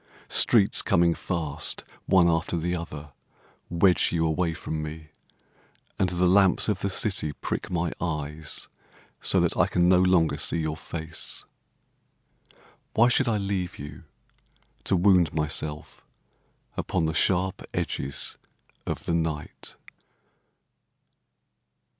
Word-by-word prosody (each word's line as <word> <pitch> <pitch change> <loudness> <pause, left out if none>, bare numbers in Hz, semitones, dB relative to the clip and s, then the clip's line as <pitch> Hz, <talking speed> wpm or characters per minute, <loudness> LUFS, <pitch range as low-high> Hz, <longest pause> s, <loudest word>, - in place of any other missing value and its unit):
Streets - - +6
coming 85 0 +3
fast, 80 -5 -2 0.2
One 90 -2 +5
after 85 +1 0
the 90 +2 -1
other, 75 -4 -7 0.6
Wedge 90 +2 +3
you 80 -1 +1
away 80 +1 0
from 80 0 -4
me, 75 0 -8 0.9
And 95 - +2
the 90 0 0
lamps 95 +1 +4
of 105 - 0
the 100 - -2
city 95 -6 0
prick - - -4
my 85 -2 -1
eyes 75 -2 -3 0.5
So - - +3
that - - +1
I - - +3
can 90 0 +2
no 90 0 +5
longer 90 -3 +2
see - - 0
your 80 -1 -2
face. 80 0 -6 1.5
Why 120 +2 +5
should 130 +1 +2
I 110 -2 +1
leave 95 -3 -3
you, 75 +2 -10 0.8
To 95 - +2
wound 90 -4 +3
myself 75 -1 -4 0.7
upon 85 -3 -1
the 80 - -1
sharp 90 +5 +1
edges 70 +1 -3 0.5
of - - -4
the - - -1
night? 80 -2 -3
85 Hz, 125 wpm, -26 LUFS, 80-90 Hz, 1.5 s, Streets